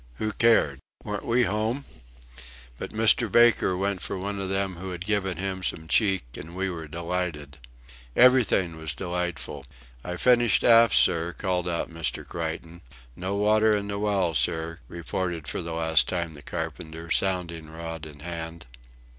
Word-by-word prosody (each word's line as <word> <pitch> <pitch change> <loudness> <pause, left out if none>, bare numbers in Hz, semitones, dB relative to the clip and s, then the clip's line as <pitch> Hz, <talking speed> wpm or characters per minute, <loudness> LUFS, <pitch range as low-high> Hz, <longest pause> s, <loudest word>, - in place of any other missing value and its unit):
Who 110 - -2
cared? 105 - +3 0.2
Weren't - - -4
we 120 +1 +3
home! 110 +6 -1 0.9
But - - -5
Mr. 110 0 +3
Baker 120 -5 +4
went 100 0 -1
for - - -2
one 100 +2 -3
of 95 -1 -3
them 95 -2 -1
who 95 +2 -6
had 90 0 -6
given 95 -4 0
him 95 0 -3
some 80 -3 -3
cheek, 95 +2 +3
and 80 +4 -9
we 95 0 -1
were 80 -2 -6
delighted. 85 -3 -4 0.6
Everything 120 -10 +4
was 80 -2 -5
delightful. 90 -5 -4 0.4
"I've 90 0 -5
finished 120 -2 +4
aft, 115 -3 +6
sir," 85 +1 +3
called 90 -2 -1
out 85 -1 -2
Mr. 80 -6 -3
Creighton. 85 +1 -5 0.3
"No 95 +2 -3
water 105 +1 +4
in 100 -1 -2
the 100 0 -3
well, 100 -5 +1
sir," 80 +4 0
reported 85 -1 -4
for - - -2
the 85 -1 -5
last 80 -2 +3
time 85 -3 -2
the 75 - -12
carpenter, 80 0 -6
sounding 85 -5 -1
rod 80 0 -7
in 75 -1 -13
hand. 85 0 -6
90 Hz, 160 wpm, -26 LUFS, 80-100 Hz, 0.9 s, aft